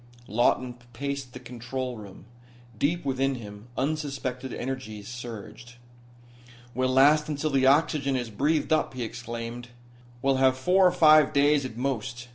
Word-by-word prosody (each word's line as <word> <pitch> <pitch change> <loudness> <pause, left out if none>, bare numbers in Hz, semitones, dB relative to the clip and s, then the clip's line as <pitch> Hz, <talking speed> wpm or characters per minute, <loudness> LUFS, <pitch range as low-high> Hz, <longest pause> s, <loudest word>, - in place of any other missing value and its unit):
Lawton 120 +3 +1 0.2
paced 140 0 -4
the - - -8
control 125 +1 -5
room. 100 -3 -11 0.5
Deep 160 +8 0
within 135 0 0
him 105 -2 -10
unsuspected 135 -3 -3
energies 120 -5 -5
surged. 120 0 -9 1.0
"We'll 130 +1 0
last 145 +4 +4
until 150 +1 -1
the 135 -1 +3
oxygen 140 -1 +3
is 120 -3 -3
breathed 150 +9 +1
up," 155 -4 0
he 125 - -3
exclaimed. 115 +1 -6 0.6
"We'll 135 -1 +3
have 130 -1 +3
four 180 +7 +4
or - - +3
five 155 -4 +6
days, 145 0 +3
at 115 -3 -7
most. 120 -2 -3
130 Hz, 140 wpm, -27 LUFS, 120-140 Hz, 1.0 s, five